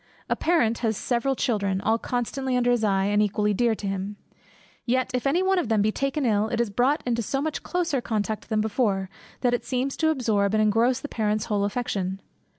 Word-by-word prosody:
A - - +2
parent 240 -10 +1
has 225 -3 0
several 265 +2 0
children, 200 -7 0
all 225 +3 +1
constantly 250 +2 -2
under 245 0 +2
his 240 -2 +1
eye, 195 -2 +2
and 205 +1 +2
equally 210 0 +1
dear 230 +2 +2
to 205 - -8
him. 195 +1 -3 0.7
Yet 255 +1 0
if 250 +2 0
any 340 +7 +2
one 380 0 +3
of 255 - -2
them 215 -2 +3
be 215 - +2
taken 275 +3 -1
ill, 215 -2 +2
it 235 0 -2
is 235 -3 0
brought 255 +8 +1
into 235 -1 0
so 270 +5 -2
much 305 +1 -2
closer 340 -7 -1
contact 215 -2 -3
than 215 -1 +1
before, 205 -4 0 0.3
that 245 -2 +2
it 245 - 0
seems 265 +1 -2
to 315 - +2
absorb 220 -8 +1
and 215 - +3
engross 230 +4 +2
the - - -5
parent's 215 -3 -1
whole 205 -2 0
affection. 195 -4 -2
230 Hz, 215 wpm, -25 LUFS, 210-255 Hz, 0.7 s, one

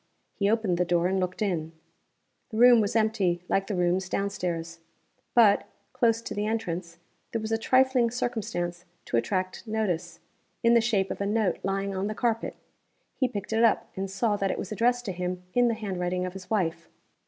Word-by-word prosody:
He 200 0 +1
opened 210 -6 +1
the - - +4
door 175 -1 +1
and 190 +1 +1
looked 185 +3 -2
in. 165 -5 -2 0.8
The 220 - -5
room 240 -1 +7
was 205 +1 -1
empty, 205 -6 +1
like 195 0 +1
the 205 - -2
rooms 180 +1 +1
down 200 +1 -1
stairs. 170 -3 -4 0.6
But, 220 -4 +5 0.3
close 230 -1 +2
to - - -5
the 205 +1 -1
entrance, 175 -6 -3 0.3
there 225 - -1
was 220 0 -4
a 225 - +2
trifling 255 0 +3
circumstance 195 -8 -3 0.2
to 120 - 0
attract 185 - -2
notice, 215 -6 -2 0.4
in 230 0 +5
the 235 - +6
shape 210 -4 +1
of - - -5
a 200 - 0
note 215 -1 +1
lying 195 +1 -2
on 190 +2 -1
the 215 - -3
carpet. 230 0 -1 0.6
He 260 - +1
picked 205 -3 -5
it 225 +1 +3
up, 230 - +2
and 195 0 -3
saw 205 +2 0
that 195 -1 0
it - - -1
was 190 - -5
addressed 245 +3 +1
to 200 - -2
him 180 0 -4
in 245 0 +4
the 230 - +1
handwriting 180 -4 -2
of 180 - -5
his 190 -1 -10
wife. 170 -6 -1
200 Hz, 200 wpm, -27 LUFS, 180-225 Hz, 0.8 s, room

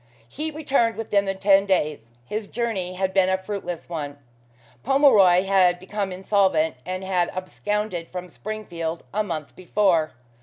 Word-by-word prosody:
He 305 - -4
returned 275 -7 +1
within 205 -2 0
the 195 0 -2
ten 195 0 +4
days. 150 -10 0 0.2
His 210 - -4
journey 205 -7 -2
had 190 0 -1
been 190 -1 +4
a 190 - +2
fruitless 190 -3 -5
one. 145 -4 -5 0.6
Pomeroy 220 -10 +5
had 190 -2 +4
become 195 +1 -3
insolvent, 185 -5 +2
and 185 +1 -3
had 180 -2 +1
absconded 185 -1 -3
from 180 0 -6
Springfield 175 -4 -5
a 210 - +1
month 160 -7 -5
before. 180 -4 +1
190 Hz, 145 wpm, -24 LUFS, 175-210 Hz, 0.6 s, Pomeroy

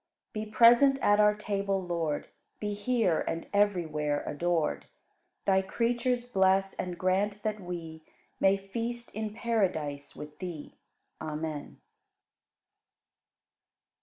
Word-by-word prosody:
42. 215 0 -4
Be - - -17
present 245 +3 +7
at 205 -4 +4
our 210 0 +5
table, 200 -2 -1
Lord, 170 -5 -2 0.3
Be 210 -1 -2
here 205 -5 +1
and 165 - -3
everywhere 160 -8 +1
adored. 165 0 -1 0.6
Thy 190 -1 +4
creatures 240 +4 0
bless 195 -3 +3
and 180 -1 -4
grant 200 +3 0
that 215 -1 -1
we 170 -3 -7 0.4
May 195 +1 +4
feast 235 +5 -5
in 215 0 -3
paradise 180 -11 -1
with 150 0 -10
Thee. 175 -5 -6 0.5
Amen. 155 -1 -5
195 Hz, 110 wpm, -29 LUFS, 165-215 Hz, 0.6 s, present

